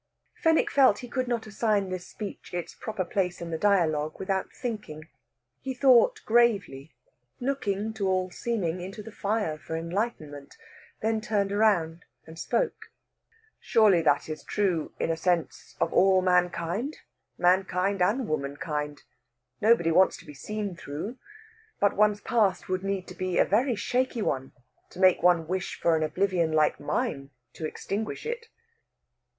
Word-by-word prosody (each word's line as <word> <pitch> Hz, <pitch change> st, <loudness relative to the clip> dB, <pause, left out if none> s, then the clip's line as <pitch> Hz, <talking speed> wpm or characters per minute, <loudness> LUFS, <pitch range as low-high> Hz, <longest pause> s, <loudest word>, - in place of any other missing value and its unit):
Fenwick 325 Hz, -1 st, +2 dB
felt 265 Hz, -7 st, +5 dB
he -, -, -10 dB
could 255 Hz, +1 st, -2 dB
not 235 Hz, -2 st, -1 dB
assign 210 Hz, -2 st, 0 dB
this 185 Hz, -1 st, -5 dB
speech 205 Hz, -4 st, -8 dB
its 175 Hz, -, -4 dB
proper 215 Hz, -4 st, -4 dB
place 180 Hz, 0 st, -1 dB
in 170 Hz, -1 st, -6 dB
the 160 Hz, -, -1 dB
dialogue 155 Hz, -7 st, +2 dB
without 190 Hz, 0 st, -2 dB
thinking. 210 Hz, -, -6 dB, 0.5 s
He 265 Hz, -1 st, -5 dB
thought 260 Hz, -, +5 dB
gravely, 200 Hz, -, +1 dB, 0.4 s
looking 220 Hz, -5 st, -2 dB
to 205 Hz, -3 st, -2 dB
all 185 Hz, -1 st, 0 dB
seeming 185 Hz, -6 st, -2 dB
into 195 Hz, +4 st, -7 dB
the 225 Hz, -, -10 dB
fire 205 Hz, -7 st, -2 dB
for 160 Hz, -, -5 dB
enlightenment; 165 Hz, -5 st, -4 dB, 0.5 s
then 220 Hz, 0 st, +1 dB
turned 205 Hz, -3 st, 0 dB
round 180 Hz, -6 st, +1 dB, 0.2 s
and 160 Hz, 0 st, -11 dB
spoke. -, -, -1 dB, 0.7 s
"Surely 210 Hz, -6 st, +4 dB
that 145 Hz, -3 st, +2 dB
is 155 Hz, -1 st, -6 dB
true, 185 Hz, -6 st, -1 dB
in -, -, 0 dB
a -, -, 0 dB
sense, 170 Hz, 0 st, -1 dB
of 165 Hz, -, 0 dB
all 190 Hz, -1 st, +4 dB
mankind 180 Hz, -, 0 dB, 0.4 s
mankind 185 Hz, +1 st, +2 dB
and 215 Hz, +7 st, +2 dB
womankind. 150 Hz, 0 st, -3 dB, 0.6 s
Nobody 215 Hz, -6 st, +4 dB
wants 185 Hz, +3 st, +4 dB
to -, -, -15 dB
be 150 Hz, -, -10 dB
seen 205 Hz, +5 st, -5 dB
through. 170 Hz, -, -6 dB, 0.6 s
But 205 Hz, -, +2 dB
one's 210 Hz, 0 st, +3 dB
past 220 Hz, -5 st, +1 dB
would 185 Hz, 0 st, -2 dB
need 195 Hz, -1 st, -2 dB
to -, -, -8 dB
be 185 Hz, -1 st, -2 dB
a -, -, +5 dB
very 240 Hz, +6 st, +2 dB
shaky 250 Hz, +1 st, -1 dB
one 135 Hz, -6 st, -2 dB, 0.4 s
to 180 Hz, -, -13 dB
make 185 Hz, -1 st, +5 dB
one 170 Hz, -2 st, +3 dB
wish 185 Hz, +1 st, -3 dB
for 170 Hz, -1 st, +3 dB
an 160 Hz, -, 0 dB
oblivion 170 Hz, +1 st, +1 dB
like 155 Hz, -1 st, +2 dB
mine 140 Hz, -1 st, -2 dB, 0.2 s
to 160 Hz, -, -4 dB
extinguish 215 Hz, -, -4 dB
it." 470 Hz, 0 st, -4 dB
190 Hz, 155 wpm, -27 LUFS, 165-220 Hz, 0.7 s, felt